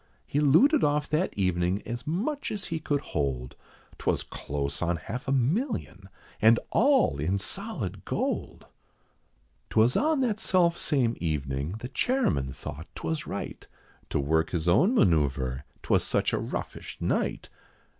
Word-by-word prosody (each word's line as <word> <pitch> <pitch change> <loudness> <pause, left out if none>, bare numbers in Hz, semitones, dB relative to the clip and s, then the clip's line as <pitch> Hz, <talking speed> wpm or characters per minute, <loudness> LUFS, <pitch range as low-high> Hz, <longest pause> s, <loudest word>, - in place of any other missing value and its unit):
He 145 - -1
looted 205 - +5
off 150 0 +2
that 160 +5 +1
evening 90 0 +1
as 120 +3 -5
much 240 - -1
as 210 -2 -4
he 160 - -1
could 145 -2 -1
hold, 65 - -3 0.4
'Twas - - 0
close 70 0 -4
on 90 0 +1
half 110 - -6
a - - 0
million, 140 - -1 0.3
and 115 +2 +6
all 265 - +3
in 90 +7 +1
solid 165 - -5
gold. - - -3 1.0
'Twas 115 +3 +3
on 305 -1 +2
that 225 -5 0
self 175 -5 +3
same 125 -9 +1
evening 70 -1 -2
the 125 - -4
chairman 130 - 0
thought 75 +4 -7
'twas 80 -1 -3
right, - - -6 0.4
To - - 0
work 80 +3 +1
his 85 -2 -2
own 175 - +4
manoeuvre, 70 - +2 0.2
'twas - - +2
such - - +1
a - - +1
roughish - - -5
night. - - -1
115 Hz, 145 wpm, -28 LUFS, -, 1.0 s, and